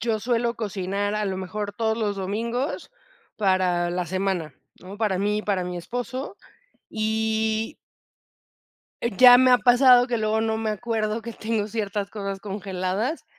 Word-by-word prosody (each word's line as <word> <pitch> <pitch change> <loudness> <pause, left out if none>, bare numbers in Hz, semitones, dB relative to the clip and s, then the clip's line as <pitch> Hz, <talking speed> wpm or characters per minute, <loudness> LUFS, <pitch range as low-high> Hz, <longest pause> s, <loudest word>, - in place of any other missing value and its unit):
yo 225 -2 -1
suelo 235 +1 0
cocinar, 205 -1 -2
a 210 0 -1
lo 190 -1 -2
mejor, 205 +2 -4
todos 220 +1 -1
los 210 -3 -1
domingos 230 - -3 0.5
para 185 -3 +1
la 180 0 -2
semana, 185 -5 -2 0.3
¿no? 190 +2 -10
Para 210 -4 0
mí 205 +2 0
y 215 - -4
para 190 -3 -1
mi 180 0 -5
esposo, 245 - -5 0.5
y 220 0 -1 1.3
ya 245 +2 +7
me 255 +1 +5
ha 250 - +6
pasado 245 0 +6
que 245 -2 -1
luego 220 0 0
no 220 0 0
me 220 -1 -2
acuerdo 215 0 -2
que 235 +1 -7
tengo 215 -1 -2
ciertas 205 -2 -3
cosas 195 -2 -5
congeladas, 195 - -3
215 Hz, 150 wpm, -24 LUFS, 195-230 Hz, 1.3 s, ya